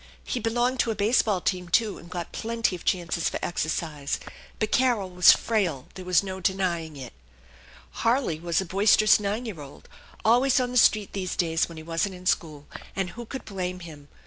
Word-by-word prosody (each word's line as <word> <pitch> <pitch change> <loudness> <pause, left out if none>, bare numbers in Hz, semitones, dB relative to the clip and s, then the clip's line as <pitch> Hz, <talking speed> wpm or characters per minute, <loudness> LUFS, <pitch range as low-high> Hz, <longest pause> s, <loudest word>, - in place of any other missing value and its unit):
He 250 - -3
belonged 240 +3 0
to 235 - +2
a 225 - -1
base 215 +5 +3
ball 200 -5 -1
team, 180 -1 -2
too, 215 +2 +1
and 170 - -14
got 175 -2 -5
plenty 230 -3 -1
of 175 - -10
chances 170 -2 0
for - - -3
exercise; 160 -4 -2 0.4
but 215 -1 -2
Carol 235 -7 +2
was 180 0 +7
frail, 185 - 0
there 185 - -8
was 180 0 +3
no 190 -1 -5
denying 175 -5 -1
i'v. 130 -3 -8 0.9
Harley 230 - +1
was 170 0 0
a 190 - -2
boisterous 205 +3 +4
nine 210 +4 -2
year 195 -10 -6
old, 140 -1 -12 0.4
always 250 +4 +4
on 250 -1 -1
the - - -6
street 215 -3 +4
these 185 -2 -3
days 165 -1 +1
when 165 - -10
he 160 - -8
wasn't 165 +4 -2
in 180 0 -13
school; 155 -5 -1 0.3
and 190 -2 -2
who 240 0 -9
could 265 - -7
blame 185 -2 -4
him? 150 -4 -11
185 Hz, 200 wpm, -26 LUFS, 170-220 Hz, 0.9 s, was